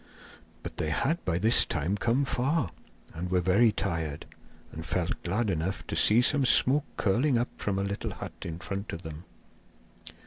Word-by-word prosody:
But -, -, -8 dB
they 80 Hz, -, -2 dB
had 135 Hz, -, -1 dB
by 85 Hz, -2 st, 0 dB
this 110 Hz, +6 st, +5 dB
time 85 Hz, +6 st, -2 dB
come 120 Hz, +6 st, +1 dB
far 130 Hz, -, 0 dB, 0.4 s
and 90 Hz, +2 st, -5 dB
were 90 Hz, 0 st, +2 dB
very 95 Hz, +6 st, +3 dB
tired, 80 Hz, -7 st, -3 dB, 0.5 s
and 80 Hz, -, -7 dB
felt 85 Hz, +2 st, -2 dB
glad 105 Hz, +4 st, -1 dB
enough 85 Hz, +2 st, -3 dB
to -, -, -5 dB
see 115 Hz, +3 st, +5 dB
some 145 Hz, +2 st, +4 dB
smoke 135 Hz, +3 st, +5 dB
curling 120 Hz, +7 st, +2 dB
up 120 Hz, +2 st, -1 dB
from 100 Hz, -2 st, -2 dB
a 100 Hz, -, 0 dB
little 100 Hz, +1 st, -4 dB
hut -, -, -8 dB
in 80 Hz, -1 st, -5 dB
front 100 Hz, +2 st, -5 dB
of 85 Hz, -, -7 dB
them. 80 Hz, +1 st, -9 dB
100 Hz, 175 wpm, -28 LUFS, 85-120 Hz, 0.5 s, this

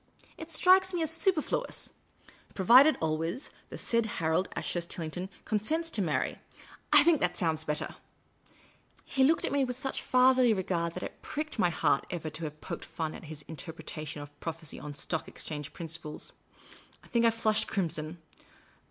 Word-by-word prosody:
It 320 Hz, -, -9 dB
strikes 370 Hz, +3 st, +5 dB
me 340 Hz, -, +1 dB
as 315 Hz, -, -1 dB
superfluous. 330 Hz, -1 st, -1 dB, 0.3 s
* -, -, -25 dB
Provided 255 Hz, +11 st, +7 dB
always 160 Hz, -, -2 dB, 0.2 s
the -, -, -7 dB
said 230 Hz, -1 st, +1 dB
Harold 165 Hz, +3 st, +1 dB
Ashurst 170 Hz, -1 st, -2 dB
Tillington 175 Hz, +3 st, -4 dB, 0.2 s
consents 315 Hz, +11 st, 0 dB
to 215 Hz, -, 0 dB
marry 160 Hz, -5 st, 0 dB
' -, -, -19 dB
— -, -, -27 dB
I -, -, +9 dB
think 335 Hz, -3 st, +4 dB
that 175 Hz, 0 st, +1 dB
sounds 160 Hz, -3 st, 0 dB
better! 150 Hz, -1 st, -2 dB, 0.6 s
" -, -, -29 dB
He 265 Hz, -, +5 dB
looked 300 Hz, +4 st, +4 dB
at -, -, -2 dB
me 280 Hz, -1 st, +2 dB
with 250 Hz, -1 st, -3 dB
such 270 Hz, +1 st, -2 dB
fatherly 255 Hz, -2 st, +5 dB
regard 170 Hz, -3 st, -1 dB
that -, -, -4 dB
it -, -, -7 dB
pricked 305 Hz, -4 st, -4 dB
my 180 Hz, -, +4 dB
heart 160 Hz, -3 st, +1 dB
ever 160 Hz, -3 st, -4 dB
to 160 Hz, +2 st, -5 dB
have 150 Hz, 0 st, -7 dB
poked -, -, -5 dB
fun 160 Hz, -2 st, -4 dB
at -, -, -9 dB
his 150 Hz, -1 st, -9 dB
Interpretation 155 Hz, -1 st, -6 dB
of 145 Hz, 0 st, -15 dB
Prophecy 165 Hz, -2 st, -6 dB
on 145 Hz, -1 st, -7 dB
Stock 155 Hz, +3 st, -3 dB
Exchange 150 Hz, -2 st, -6 dB
principles. 160 Hz, -2 st, -7 dB, 0.7 s
I -, -, -17 dB
think 235 Hz, -1 st, +2 dB
I 230 Hz, -, +7 dB
flushed 225 Hz, -1 st, +1 dB
crimson. 165 Hz, -3 st, -2 dB
175 Hz, 180 wpm, -30 LUFS, 160-260 Hz, 0.7 s, I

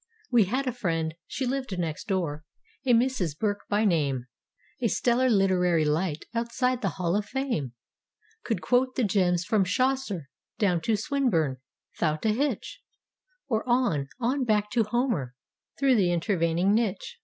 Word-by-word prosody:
We 235 Hz, -5 st, +5 dB
had 255 Hz, +8 st, -1 dB
a 255 Hz, -, 0 dB
friend—she 170 Hz, -, -3 dB
lived 255 Hz, -6 st, -2 dB
next 165 Hz, -3 st, -3 dB
door—a 170 Hz, -, -3 dB
Mrs. 230 Hz, -, +2 dB
Burke 205 Hz, +1 st, -2 dB
by 210 Hz, +2 st, +2 dB
name. 140 Hz, -, +1 dB, 0.6 s
A 235 Hz, -, +3 dB
stellar 250 Hz, +3 st, +2 dB
literary 180 Hz, -6 st, +3 dB
light, 155 Hz, +1 st, -1 dB
outside 240 Hz, +2 st, 0 dB
the 195 Hz, -, +1 dB
Hall 175 Hz, -1 st, 0 dB
of 205 Hz, 0 st, -1 dB
Fame. 235 Hz, -, -2 dB, 0.7 s
Could -, -, -2 dB
quote 255 Hz, +1 st, +2 dB
the 255 Hz, -, +1 dB
gems 180 Hz, -4 st, +2 dB
from 210 Hz, 0 st, +2 dB
Chaucer 225 Hz, -, -1 dB, 0.3 s
down 180 Hz, -5 st, +2 dB
to 225 Hz, -, +2 dB
Swin¬ 275 Hz, +5 st, 0 dB
burne 155 Hz, -, +1 dB, 0.4 s
'thout 155 Hz, +3 st, 0 dB
a -, -, +4 dB
hitch; 275 Hz, +7 st, -2 dB, 0.7 s
Or, 220 Hz, -4 st, 0 dB
on, 240 Hz, -, +2 dB
on 255 Hz, +3 st, 0 dB
back 210 Hz, -3 st, +1 dB
to 230 Hz, -1 st, +2 dB
Homer, 210 Hz, -, -1 dB, 0.4 s
through 275 Hz, -2 st, +3 dB
the 190 Hz, -7 st, +3 dB
intervening 175 Hz, +1 st, +1 dB
niche. 230 Hz, -, -1 dB
205 Hz, 150 wpm, -27 LUFS, 170-245 Hz, 0.7 s, We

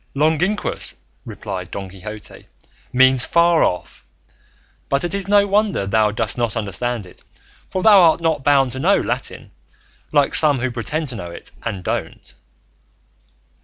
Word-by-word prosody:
"Longinquous," 160 Hz, +8 st, 0 dB, 0.3 s
replied 90 Hz, -1 st, -7 dB
Don 100 Hz, 0 st, -6 dB
Quixote, 100 Hz, +3 st, -11 dB, 0.4 s
"means 130 Hz, 0 st, +4 dB
far 170 Hz, -1 st, +3 dB
off; 90 Hz, -1 st, -3 dB, 0.9 s
but 140 Hz, 0 st, 0 dB
it 175 Hz, -, -3 dB
is 200 Hz, -1 st, -3 dB
no 205 Hz, 0 st, +4 dB
wonder 205 Hz, -, +1 dB
thou 105 Hz, +2 st, +2 dB
dost 110 Hz, +2 st, -3 dB
not 120 Hz, -1 st, -1 dB
understand 110 Hz, +2 st, -3 dB
it, 90 Hz, -, -17 dB, 0.5 s
for 185 Hz, -, -3 dB
thou 210 Hz, -3 st, +7 dB
art 165 Hz, -1 st, +4 dB
not 160 Hz, -4 st, -1 dB
bound 135 Hz, -3 st, +3 dB
to 130 Hz, -, -6 dB
know -, -, +3 dB
Latin, -, -, -5 dB, 0.6 s
like 145 Hz, -2 st, +2 dB
some 150 Hz, -3 st, +5 dB
who 130 Hz, 0 st, -2 dB
pretend 150 Hz, +6 st, -3 dB
to 125 Hz, -, -5 dB
know 90 Hz, -5 st, -7 dB
it 85 Hz, -, -10 dB
and 100 Hz, -6 st, -5 dB
don't." -, -, -5 dB
130 Hz, 150 wpm, -20 LUFS, 105-165 Hz, 0.9 s, thou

